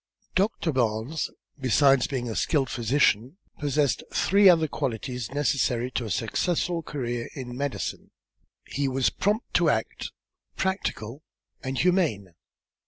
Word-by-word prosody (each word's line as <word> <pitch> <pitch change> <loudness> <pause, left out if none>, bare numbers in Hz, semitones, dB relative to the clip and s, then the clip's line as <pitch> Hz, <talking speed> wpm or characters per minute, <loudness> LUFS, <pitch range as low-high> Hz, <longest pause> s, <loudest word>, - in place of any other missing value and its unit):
Doctor 185 -4 +1
Barnes, 120 +3 0 0.3
besides 135 0 +4
being 125 -3 -3
a 110 - -4
skilled 140 -6 +1
physician, 125 - +2 0.2
possessed 145 -3 +1
three 200 0 +5
other 165 -3 +5
qualities 125 -4 -3
necessary 130 -3 0
to 120 - -2
a - - -5
successful 170 - 0
career 120 -6 -4
in 125 -3 -6
medicine 140 +1 -3 0.6
he 140 0 -1
was 130 -1 +1
prompt 210 +4 -1
to - - +4
act, - - -2 0.4
practical 150 - -2 0.4
and 130 0 -3
humane. 155 - +1
135 Hz, 120 wpm, -26 LUFS, 120-160 Hz, 0.6 s, three